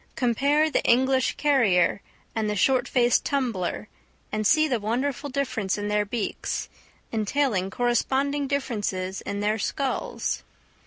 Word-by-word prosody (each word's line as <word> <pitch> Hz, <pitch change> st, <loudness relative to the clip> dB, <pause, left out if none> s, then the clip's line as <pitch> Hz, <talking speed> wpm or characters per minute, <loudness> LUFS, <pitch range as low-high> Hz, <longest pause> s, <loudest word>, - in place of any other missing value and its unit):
Compare 280 Hz, +6 st, +2 dB
the -, -, +2 dB
English 260 Hz, +1 st, +3 dB
carrier 205 Hz, -, +3 dB, 0.3 s
and 220 Hz, -3 st, -1 dB
the 210 Hz, -, -1 dB
short 260 Hz, +6 st, +2 dB
faced 245 Hz, -2 st, +3 dB
tumbler, 225 Hz, -8 st, -2 dB, 0.4 s
and 215 Hz, -1 st, 0 dB
see 310 Hz, +4 st, +4 dB
the 250 Hz, -5 st, 0 dB
wonderful 255 Hz, +7 st, -2 dB
difference 255 Hz, -8 st, -1 dB
in 205 Hz, 0 st, -3 dB
their 210 Hz, 0 st, +1 dB
beaks, 215 Hz, 0 st, -3 dB, 0.4 s
entailing 220 Hz, -3 st, 0 dB
corresponding 265 Hz, +5 st, 0 dB
differences 205 Hz, -9 st, -2 dB
in 200 Hz, 0 st, -4 dB
their 210 Hz, +2 st, 0 dB
skulls. 270 Hz, +6 st, -2 dB
240 Hz, 125 wpm, -25 LUFS, 210-275 Hz, 0.4 s, see